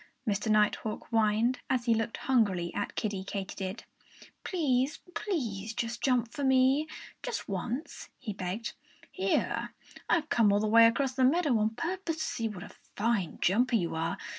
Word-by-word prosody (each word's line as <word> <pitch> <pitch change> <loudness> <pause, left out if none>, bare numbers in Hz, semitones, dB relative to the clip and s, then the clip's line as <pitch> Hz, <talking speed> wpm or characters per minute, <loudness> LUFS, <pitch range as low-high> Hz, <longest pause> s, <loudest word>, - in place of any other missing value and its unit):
Mr. 210 +1 0
Nighthawk 215 0 +1
whined, 225 +2 +2
as 245 -2 +1
he 235 - +4
looked 225 0 -1
hungrily 200 -9 +1
at 205 - -3
Kiddie 205 -4 -2
Katydid. 195 +1 -5 0.6
"Please, 280 -6 +1 0.2
please 225 - -3
jump 235 +1 0
for 285 - -4
me 265 +3 +4 0.3
just - - -4
once!" 230 - -4
he 225 -6 -5
begged. 195 +3 -4 0.4
"Here 190 +1 -1 0.3
I've 325 -3 +2
come 220 -4 +4
all 200 - +3
the 215 - 0
way 230 +1 +7
across 260 +3 0
the 260 0 +1
meadow 290 0 +3
on 215 +1 0
purpose 350 - -2
to 315 - -2
see 240 -7 -2
what 195 -4 -7
a - - -10 0.3
fine 205 -5 0
jumper 240 +6 +3
you 175 -6 0
are! 160 +1 -2
230 Hz, 160 wpm, -30 LUFS, 205-260 Hz, 0.6 s, way